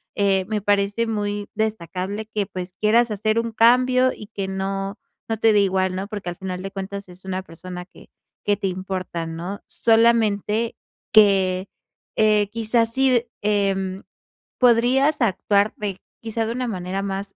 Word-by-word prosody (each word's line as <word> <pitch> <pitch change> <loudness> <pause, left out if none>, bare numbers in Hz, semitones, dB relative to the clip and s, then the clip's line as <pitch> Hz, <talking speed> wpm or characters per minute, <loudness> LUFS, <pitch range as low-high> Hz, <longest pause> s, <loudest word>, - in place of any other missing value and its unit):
Eh, 195 -2 +2
me 210 -1 -1
parece 205 +3 +1
muy 205 -2 -2
destacable 205 -1 -3
que, 210 -2 -2
pues, 185 -2 -7
quieras 230 +4 +3
hacer 215 +2 +1
un 230 0 -2
cambio 255 +3 +4
y 210 - -10
que 200 -2 -4
no, 195 +1 -3 0.3
no 225 - 0
te 225 +1 +4
dé 210 - +4
igual, 190 -1 +1
¿no? 190 +2 -3
Porque 205 -4 -5
al 175 - -6
final 185 -1 -5
de 195 - -5
cuentas 195 0 -6
es 180 +1 -14
una 190 0 -3
persona 180 +1 -8
que 185 - -18 0.4
que 205 0 +3
te 195 -1 -2
importa, 185 -2 -4
¿no? 170 +5 -5
Solamente 225 -1 +2 0.3
que, 195 -3 +4 0.5
eh, 210 -1 +3
quizás 230 +1 +1
sí, 260 -3 +3 0.2
em, 195 -2 0 0.5
podrías 255 +5 +4
actuar 205 -1 +2
de 200 -3 -4 0.2
quizá 225 0 -2
de 225 - -2
una 250 0 -2
manera 185 -1 -3
más 195 0 -4
205 Hz, 160 wpm, -22 LUFS, 190-225 Hz, 0.5 s, cambio